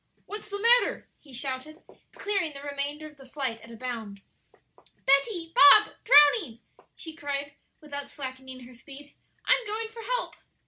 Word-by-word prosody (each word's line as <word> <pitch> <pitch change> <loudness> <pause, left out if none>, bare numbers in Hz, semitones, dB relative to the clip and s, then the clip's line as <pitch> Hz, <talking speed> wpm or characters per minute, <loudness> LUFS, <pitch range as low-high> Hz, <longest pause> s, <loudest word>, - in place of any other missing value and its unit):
"What's 425 +1 -9
the 405 0 -5
matter?" 475 +3 +3
he 285 - -18
shouted, 265 +5 -6 0.3
clearing 390 -7 -1
the 280 0 -9
remainder 285 +1 -4
of 305 -1 -13
the 270 -1 -15
flight 255 -5 -3
at 230 - -14
a 230 - -11
bound. 220 -5 -7 0.8
"Betty, 330 +5 +1
Bob 385 +3 +7
drowning!" 290 - +5 0.4
she 320 - -9
cried, 285 -2 -5 0.3
without 285 -2 -7
slackening 260 -2 -8
her 250 +1 -14
speed, 280 +4 -14 0.3
"I'm 485 - +2
going 440 +1 -3
for 455 +1 -11
help." - - -3
285 Hz, 150 wpm, -27 LUFS, 265-375 Hz, 0.8 s, Bob